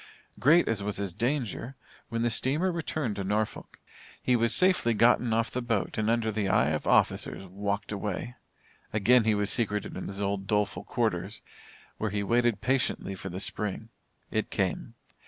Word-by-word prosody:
Great 165 Hz, +6 st, +5 dB
as 110 Hz, -3 st, 0 dB
was 105 Hz, 0 st, -2 dB
his 100 Hz, -3 st, -3 dB
danger, 125 Hz, -, -2 dB, 0.3 s
when 115 Hz, 0 st, -1 dB
the 120 Hz, -, +2 dB
steamer 150 Hz, +11 st, +1 dB
returned 155 Hz, -8 st, -2 dB
to 100 Hz, -, -3 dB
Norfolk, 105 Hz, +2 st, -2 dB, 0.4 s
he 125 Hz, -, +2 dB
was 115 Hz, -1 st, +2 dB
safely 180 Hz, -6 st, +4 dB
gotten 120 Hz, +1 st, +4 dB
off 115 Hz, +1 st, +1 dB
the 125 Hz, -, -2 dB
boat 115 Hz, -4 st, -1 dB
and 110 Hz, 0 st, 0 dB
under 115 Hz, -1 st, +1 dB
the 105 Hz, -2 st, -1 dB
eye 75 Hz, -5 st, +3 dB
of 75 Hz, -, -2 dB
officers 95 Hz, -, +2 dB
walked 100 Hz, +2 st, -3 dB
away. 105 Hz, +3 st, -3 dB, 0.6 s
Again 115 Hz, +3 st, +4 dB
he 110 Hz, -1 st, +3 dB
was 105 Hz, 0 st, 0 dB
secreted 105 Hz, -3 st, -1 dB
in 95 Hz, -, -5 dB
his 100 Hz, 0 st, -6 dB
old 100 Hz, -1 st, -2 dB
doleful 105 Hz, -1 st, 0 dB
quarters, -, -, -2 dB, 0.6 s
where 110 Hz, -, 0 dB
he 100 Hz, 0 st, -2 dB
waited 120 Hz, 0 st, +2 dB
patiently 130 Hz, -6 st, 0 dB
for 95 Hz, 0 st, -6 dB
the 90 Hz, +1 st, -5 dB
Spring. 105 Hz, +2 st, -2 dB, 0.4 s
It -, -, -1 dB
came. -, -, -2 dB
110 Hz, 175 wpm, -28 LUFS, 100-120 Hz, 0.6 s, Great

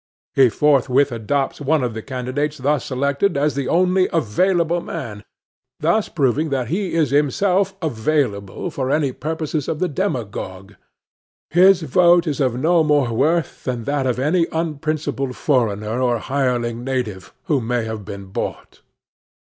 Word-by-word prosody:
He 130 Hz, -2 st, +5 dB
forthwith 140 Hz, +2 st, +3 dB
adopts 135 Hz, +6 st, -2 dB
one 145 Hz, 0 st, +1 dB
of 120 Hz, -2 st, -2 dB
the 110 Hz, -, -5 dB
candidates 130 Hz, +4 st, -3 dB
thus 140 Hz, 0 st, 0 dB
selected 140 Hz, +6 st, 0 dB
as 145 Hz, +1 st, +1 dB
the 140 Hz, -1 st, -2 dB
only 185 Hz, +2 st, +2 dB
available 170 Hz, -, +1 dB
one, 115 Hz, -14 st, -6 dB, 0.6 s
thus 170 Hz, +8 st, +1 dB
proving 150 Hz, +1 st, +1 dB
that 130 Hz, -4 st, -2 dB
he 185 Hz, -1 st, -2 dB
is 155 Hz, -6 st, +2 dB
himself 185 Hz, +7 st, +2 dB
available 120 Hz, -, -1 dB
for 130 Hz, -3 st, -3 dB
any 140 Hz, -1 st, +1 dB
purposes 155 Hz, +1 st, -3 dB
of 155 Hz, -, -2 dB
the 185 Hz, -, 0 dB
demagogue. 115 Hz, -, -4 dB, 0.8 s
His 185 Hz, +1 st, +5 dB
vote 175 Hz, +1 st, +4 dB
is 150 Hz, -3 st, -2 dB
of 130 Hz, -4 st, +1 dB
no 165 Hz, +3 st, +3 dB
more 145 Hz, -6 st, +2 dB
worth 155 Hz, +7 st, 0 dB
than 125 Hz, -3 st, -3 dB
that 140 Hz, +1 st, -1 dB
of 125 Hz, -, 0 dB
any 165 Hz, +6 st, +2 dB
unprincipled 155 Hz, -4 st, -2 dB
foreigner 115 Hz, -4 st, 0 dB
or 120 Hz, -2 st, +2 dB
hireling 120 Hz, -2 st, -1 dB
native, 110 Hz, -8 st, -3 dB
who 150 Hz, -8 st, 0 dB
may 120 Hz, 0 st, -1 dB
have 110 Hz, -2 st, -5 dB
been 100 Hz, +1 st, -8 dB
bought. 95 Hz, -, -6 dB
140 Hz, 150 wpm, -20 LUFS, 120-160 Hz, 0.8 s, He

